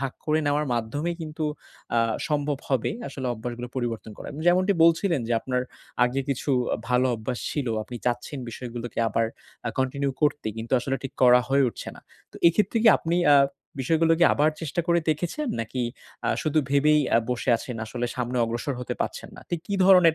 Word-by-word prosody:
ভাগ 135 -2 -2
করে 155 0 +3
নেওয়ার 145 +1 +1
মাধ্যমেই 145 +9 -2
কিন্তু 155 0 -4 0.5
অ্যা 115 - +3 0.3
সম্ভব 145 -2 0
হবে। 130 -4 +1 0.2
আসলে 130 -2 -5
অভ্যাসগুলো 120 +2 -5
পরিবর্তন 115 -3 -3
করা। - - -7 0.2
যেমনটি 185 +3 +4
বলছিলেন 165 -2 +3
যে, - - +1
আপনার 125 -1 -1 0.4
আগে 130 +3 0
কিছু 140 +2 -1 0.2
আ - - -1
ভালো 125 +1 +3
অভ্যাস 115 +2 -4
ছিলো, 130 -6 -1
আপনি 120 +3 -8
চাচ্ছেন 125 +4 -1
বিষয়গুলোকে 120 -1 -6
আবার 115 +2 +1 0.4
অ্যা 115 - -2
কন্টিনিউ 135 +1 0
করতে 145 -5 +1
কিন্তু 115 +3 -6
আসলে 135 +2 -1
ঠিক 135 -2 -5
করা 125 0 +7
হয়ে 140 0 +4
উঠছে - - -7
না। - - -14 0.3
তো - - -11
এক্ষেত্রে 205 +5 +1
কি 230 - +7
আপনি 170 +1 -1
অ্যা 145 -1 +7 0.4
বিষয়গুলো 165 +4 +3
কি 170 - +6
আবার 150 +2 +3
চেষ্টা 160 +2 -2
করে 170 0 +4
দেখেছেন? 175 - -2
নাকি 125 +3 -3 0.4
অ্যা - - +1
শুধু 155 0 +1
ভেবেই 150 +2 +4
অ্যা - - +5
বসে 125 +1 -3
আছেন? 125 +1 -6
আসলে 120 +2 -3
সামনে 125 0 -2
অগ্রসর 120 +4 -3
হতে 125 - -3
পারছেন - - -3
না? - - -10
ঠিক 170 -2 -1
কী 200 - -2
ধরনের 180 -4 +7
135 Hz, 190 wpm, -25 LUFS, 120-155 Hz, 0.5 s, করা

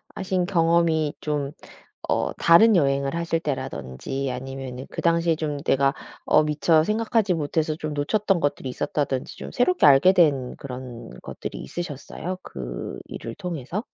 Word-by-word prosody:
하신 185 -1 -1
경험이 165 -4 +2
좀 145 -2 -2 0.6
어 - - 0
다른 200 +6 +6
여행을 140 -2 +1
하실 170 -1 -1
때라든지 135 - -4
아니면은 130 0 -6
그 - - -4
당시에 170 -1 +2
좀 150 -2 -2
내가 135 0 +2 0.3
어 155 - +5
미처 155 +1 +3
생각하지 215 0 +1
못해서 155 -1 -1
좀 155 -1 -4
놓쳤던 195 +6 +1
것들이 145 -2 -1
있었다든지 130 +1 -2
좀 - - -7
새롭게 360 +9 +3
알게된 145 -3 +5
그런 125 -3 -8
것들이 - - -7
있으셨어요 175 +2 -5
그 - - -6
일을 115 - -7
통해서? 175 - -4
150 Hz, 315 characters per minute, -24 LUFS, 135-170 Hz, 0.6 s, 다른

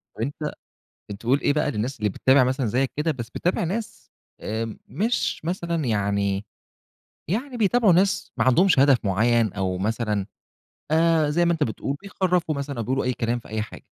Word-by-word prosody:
طب، - - -7
أنت 145 +5 -4 0.7
أنت 100 - -6
بتقول 130 +5 +2
إيه 145 - +2
بقى 150 -1 0
للناس 125 +5 -3
اللي 105 -1 +1
بتتابع 130 +6 +4
مثلًا 130 0 0
زيك 125 +5 0
كده، 160 +2 +1
بس 120 -4 -6
بتتابع 180 +5 -1
ناس 210 +6 -5 0.3
آمم، 110 +1 -4
مش 225 +5 -1
مثلًا 170 -3 -2
يعني 100 -2 0 0.8
يعني 245 - -2
بيتابعوا 220 -2 +4
ناس 190 +3 +1
ما - - +1
عندهمش 165 +5 +4
هدف 135 -5 +5
معين 110 +2 +2
أو 95 -2 -2
مثلًا 105 -1 -1 0.7
آآ، 160 -2 +3
زي 170 +3 +2
ما 170 - +3
أنت 155 -2 0
بتقول، 135 +5 -3
بيخرّفوا 180 -5 0
مثلًا 140 -2 -4
أو 115 - -2
بيقولوا 130 +4 -1
أي 125 0 0
كلام 120 +1 -1
في - - -16
أي 110 0 -2
حاجة. 105 - -9
135 Hz, 180 wpm, -24 LUFS, 110-170 Hz, 0.8 s, هدف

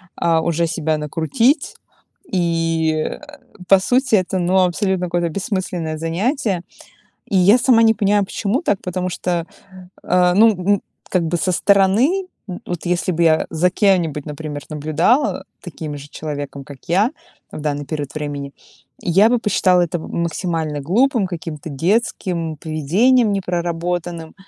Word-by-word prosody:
а, 165 -1 +2
уже 170 +1 0
себя 160 -2 -1
накрутить. 165 - 0 0.6
И, 165 -2 +1
э, 155 - -3 0.5
по 195 0 +6
сути 250 +4 +2
это, 185 -1 0
ну, 180 +2 +1
абсолютно 180 0 0
какое-то 175 0 0
бессмысленное 180 -3 -3
занятие. 190 - -1 0.7
И 200 - 0
я 195 +6 +6
сама 235 -2 +4
не 225 -1 +5
понимаю, 205 -1 +2
почему 215 - -2
так, 205 - 0
потому 180 0 -3
что, 175 -2 -2 0.6
э, 180 0 +3
ну, 220 +4 +6
м, 200 0 0 0.3
как 180 -3 +1
бы 165 +2 0
со 185 - 0
стороны, 205 - +3 0.2
м, 180 - -6
вот 175 -2 -5
если 180 +1 0
бы 170 0 0
я 160 -1 +3
за 170 +2 +2
кем-нибудь, 175 -7 +1
например, 150 -1 -6
наблюдала, 155 - +1
э, - - -14 0.2
таким 155 -4 -7
же 140 +1 -11
человеком, 145 -2 -6
как 140 +1 -11
я 200 +8 +3 0.4
в - - -6
данный 145 -1 -3
период 145 -3 -5
времени- 145 -2 -5 0.5
я 195 +6 +4
бы 245 - +3
посчитала 185 -4 +2
это 175 0 -1
м 170 +1 -4
максимально 160 -3 -2
глупым, 225 - +2
каким-то 165 -3 -6
детским 170 - -1
поведением, 195 - +2
не 200 - 0
проработанным. 175 -1 -3
175 Hz, 150 wpm, -19 LUFS, 160-200 Hz, 0.7 s, по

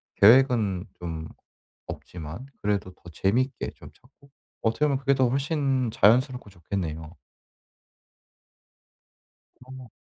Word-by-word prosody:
계획은 110 -5 +5 0.2
좀 80 -2 -5 0.6
없지만 85 +7 -8 0.2
그래도 100 -3 -1
더 - - -34
재밌게 115 - 0
좀 - - -12
찾고 140 +2 -25 0.3
어떻게 115 +6 +1
보면 140 -2 +1
그게 140 +1 +2
더 130 -2 +2
훨씬 135 -2 0
자연스럽고 125 +1 +3
좋겠네요. 85 -3 -5 2.5
어. 130 -2 -11
115 Hz, 220 characters per minute, -26 LUFS, 95-130 Hz, 2.5 s, 계획은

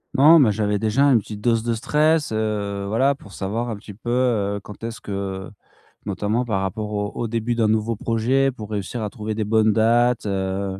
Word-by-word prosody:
Non 155 +4 +7
mais 120 -6 +5
j'avais 105 -1 0
déjà 110 +6 +2
une 135 -5 +5
petite 105 0 -8
dose 115 0 +1
de 115 0 0
stress, 150 +4 +1
heu, 105 -2 -2
voilà 130 +7 +2
pour 105 -7 -15
savoir 110 +6 -3
un 110 - -3
petit 105 0 -11
peu, 115 +4 -8
heu, 110 -5 +1
quand 105 +2 -12
est-ce 115 0 -5
que, 105 - -8
heu, 95 -1 -4 0.6
notamment 105 +5 -1
par 100 -5 -1
rapport 105 +3 -3
au 105 0 -2
au 115 - -3
début 115 +1 -1
d'un 115 -2 +1
nouveau 110 +1 +1
projet 120 +5 +1
pour 110 -4 -9
réussir 105 +3 -3
à 105 - -3
trouver 110 -2 -5
des 110 - -1
bonnes 110 0 +3
dates, 115 +2 +2
heu 95 -1 -2
110 Hz, 210 wpm, -22 LUFS, 105-120 Hz, 0.6 s, Non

